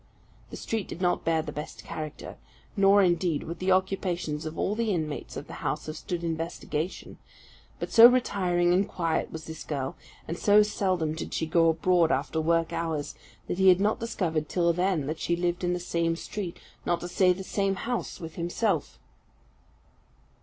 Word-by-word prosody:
The -, -, -8 dB
street 220 Hz, -4 st, -3 dB
did -, -, -7 dB
not 180 Hz, -1 st, +1 dB
bear 160 Hz, -1 st, +1 dB
the 155 Hz, -, -6 dB
best 150 Hz, +1 st, -7 dB
character; 155 Hz, -1 st, -7 dB, 0.4 s
nor, 200 Hz, 0 st, +5 dB
indeed, 175 Hz, -3 st, +1 dB
would 170 Hz, +1 st, -6 dB
the 185 Hz, +1 st, +1 dB
occupations 180 Hz, -5 st, 0 dB
of 155 Hz, -, -7 dB
all 205 Hz, -, 0 dB
the 230 Hz, +1 st, -1 dB
inmates 155 Hz, -5 st, -3 dB
of -, -, -6 dB
the -, -, -10 dB
house -, -, -2 dB
have 155 Hz, -, -5 dB
stood 175 Hz, +2 st, -4 dB
investigation; 165 Hz, 0 st, -4 dB, 0.6 s
but -, -, -4 dB
so 230 Hz, 0 st, +10 dB
retiring 180 Hz, -8 st, +2 dB
and 195 Hz, +2 st, +2 dB
quiet 165 Hz, -2 st, -1 dB
was 160 Hz, -1 st, -7 dB
this 160 Hz, 0 st, -7 dB
girl, 135 Hz, -3 st, -3 dB, 0.3 s
and 165 Hz, -, -4 dB
so 210 Hz, +1 st, +6 dB
seldom 185 Hz, -6 st, 0 dB
did 160 Hz, -, -5 dB
she 160 Hz, -, 0 dB
go 165 Hz, +1 st, +4 dB
abroad 170 Hz, +1 st, +3 dB
after 160 Hz, -, 0 dB
work 165 Hz, +1 st, +1 dB
hours, 160 Hz, -3 st, -2 dB, 0.3 s
that 180 Hz, -, -3 dB
he 190 Hz, 0 st, +7 dB
had 180 Hz, 0 st, +6 dB
not 210 Hz, +2 st, +1 dB
discovered 165 Hz, -9 st, -2 dB
till 170 Hz, -2 st, +2 dB
then 180 Hz, -4 st, 0 dB
that 155 Hz, +3 st, -4 dB
she 170 Hz, -, 0 dB
lived 175 Hz, +1 st, -1 dB
in 175 Hz, 0 st, +1 dB
the 180 Hz, -, -2 dB
same 170 Hz, -1 st, 0 dB
street, 180 Hz, 0 st, -5 dB, 0.3 s
not 175 Hz, -, 0 dB
to 175 Hz, -, -4 dB
say 180 Hz, +1 st, +3 dB
the 185 Hz, +2 st, -3 dB
same 195 Hz, 0 st, 0 dB
house 245 Hz, +4 st, -3 dB
with 165 Hz, -2 st, -8 dB
himself. 175 Hz, +6 st, -1 dB
175 Hz, 185 wpm, -27 LUFS, 160-190 Hz, 0.6 s, so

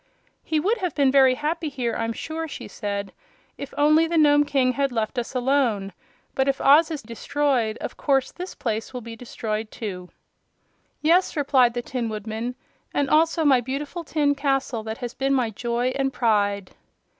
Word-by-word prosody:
"He 315 Hz, -, 0 dB
would 430 Hz, +9 st, +1 dB
have 360 Hz, -5 st, -2 dB
been 275 Hz, -2 st, +3 dB
very 265 Hz, -2 st, +5 dB
happy 310 Hz, +3 st, -2 dB
here, 250 Hz, -4 st, -2 dB
I'm 230 Hz, 0 st, -1 dB
sure," 320 Hz, +7 st, -5 dB
she 295 Hz, -, -8 dB
said, 200 Hz, -2 st, -4 dB, 0.4 s
"if 280 Hz, -, -7 dB
only 305 Hz, +3 st, +4 dB
the 335 Hz, 0 st, 0 dB
Nome 290 Hz, -1 st, +5 dB
King 270 Hz, -3 st, +2 dB
had 275 Hz, +1 st, 0 dB
left 225 Hz, +1 st, -1 dB
us 240 Hz, +2 st, -6 dB
alone. 245 Hz, -7 st, +1 dB, 0.4 s
But 265 Hz, 0 st, +1 dB
if 275 Hz, 0 st, +1 dB
Oz 300 Hz, +4 st, +6 dB
is 310 Hz, -5 st, -5 dB
destroyed 235 Hz, 0 st, -1 dB
of -, -, -5 dB
course 270 Hz, -2 st, +1 dB
this 360 Hz, +1 st, -7 dB
place 225 Hz, +1 st, -3 dB
will 250 Hz, -, -4 dB
be 230 Hz, 0 st, -8 dB
destroyed 220 Hz, -2 st, -4 dB
too." 185 Hz, -6 st, -6 dB, 0.9 s
"Yes," 340 Hz, +2 st, +3 dB
replied 260 Hz, -4 st, +3 dB
the 240 Hz, -, -2 dB
Tin 240 Hz, -2 st, -3 dB
Woodman, 220 Hz, +3 st, -4 dB, 0.4 s
"and 280 Hz, -2 st, 0 dB
also 320 Hz, +1 st, +3 dB
my 265 Hz, -4 st, +5 dB
beautiful 285 Hz, +7 st, -4 dB
tin 295 Hz, -2 st, +1 dB
castle, 270 Hz, -4 st, -1 dB
that 220 Hz, +1 st, -5 dB
has 245 Hz, -2 st, -5 dB
been 270 Hz, 0 st, 0 dB
my 245 Hz, -4 st, +1 dB
joy 240 Hz, +3 st, -1 dB
and 270 Hz, -1 st, 0 dB
pride." 205 Hz, -5 st, +1 dB
265 Hz, 180 wpm, -24 LUFS, 230-290 Hz, 0.9 s, Oz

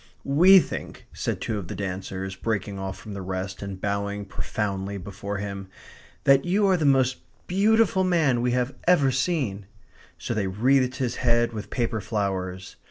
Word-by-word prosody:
"We 175 Hz, +8 st, +7 dB
think," 185 Hz, -, -2 dB
said -, -, -2 dB
two 110 Hz, -2 st, -2 dB
of 90 Hz, -, -7 dB
the -, -, -5 dB
dancers, 95 Hz, 0 st, -4 dB
breaking 100 Hz, -1 st, -3 dB
off 95 Hz, 0 st, -4 dB
from 105 Hz, -, -9 dB
the 100 Hz, -, -5 dB
rest, 95 Hz, 0 st, -4 dB
and 100 Hz, -1 st, -6 dB
bowing 100 Hz, +1 st, -2 dB
profoundly 100 Hz, -1 st, -3 dB
before 100 Hz, +2 st, -5 dB
him, 100 Hz, -1 st, -5 dB, 0.6 s
"that 135 Hz, 0 st, +5 dB
you 200 Hz, +4 st, +2 dB
are 190 Hz, -1 st, +4 dB
the 160 Hz, -4 st, 0 dB
most 130 Hz, -2 st, +3 dB, 0.3 s
beautiful 200 Hz, 0 st, +3 dB
man 160 Hz, -9 st, +2 dB
we 125 Hz, -, +1 dB
have 125 Hz, +1 st, 0 dB
ever 145 Hz, -7 st, +5 dB
seen." 130 Hz, -, -1 dB, 0.5 s
So -, -, -3 dB
they 105 Hz, -4 st, -1 dB
wreathed 125 Hz, +6 st, +2 dB
his 125 Hz, -3 st, -2 dB
head 120 Hz, -1 st, +2 dB
with 105 Hz, -1 st, -6 dB
paper 115 Hz, -3 st, -1 dB
flowers. 95 Hz, -2 st, -3 dB
110 Hz, 165 wpm, -25 LUFS, 100-135 Hz, 0.6 s, We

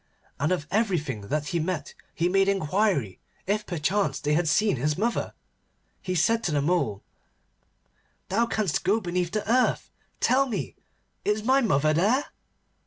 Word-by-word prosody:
And 150 Hz, +4 st, +1 dB
of 175 Hz, -5 st, 0 dB
everything 155 Hz, -, -1 dB
that 150 Hz, +2 st, -2 dB
he 170 Hz, -, 0 dB
met 170 Hz, 0 st, -3 dB, 0.2 s
he 170 Hz, -, +1 dB
made 195 Hz, +2 st, +3 dB
inquiry 185 Hz, -, 0 dB, 0.3 s
if 210 Hz, +2 st, -1 dB
perchance 175 Hz, -2 st, 0 dB
they 150 Hz, 0 st, 0 dB
had 165 Hz, +2 st, +1 dB
seen 205 Hz, +2 st, +2 dB
his 150 Hz, +4 st, 0 dB
mother. 230 Hz, +4 st, -1 dB, 0.7 s
He 185 Hz, -1 st, -3 dB
said 230 Hz, +7 st, +2 dB
to 170 Hz, -, 0 dB
the 145 Hz, -, +1 dB
Mole, 140 Hz, -, 0 dB, 1.3 s
'Thou 230 Hz, +5 st, +2 dB
canst 210 Hz, -8 st, -1 dB
go 200 Hz, +5 st, +2 dB
beneath 180 Hz, -3 st, -2 dB
the 210 Hz, +2 st, -3 dB
earth. 250 Hz, +3 st, +1 dB, 0.3 s
Tell 275 Hz, +2 st, +3 dB
me, 180 Hz, -, -4 dB, 0.5 s
is 210 Hz, +1 st, 0 dB
my 265 Hz, +4 st, +4 dB
mother 155 Hz, -, +2 dB
there? 215 Hz, -, +2 dB
180 Hz, 155 wpm, -26 LUFS, 150-215 Hz, 1.3 s, my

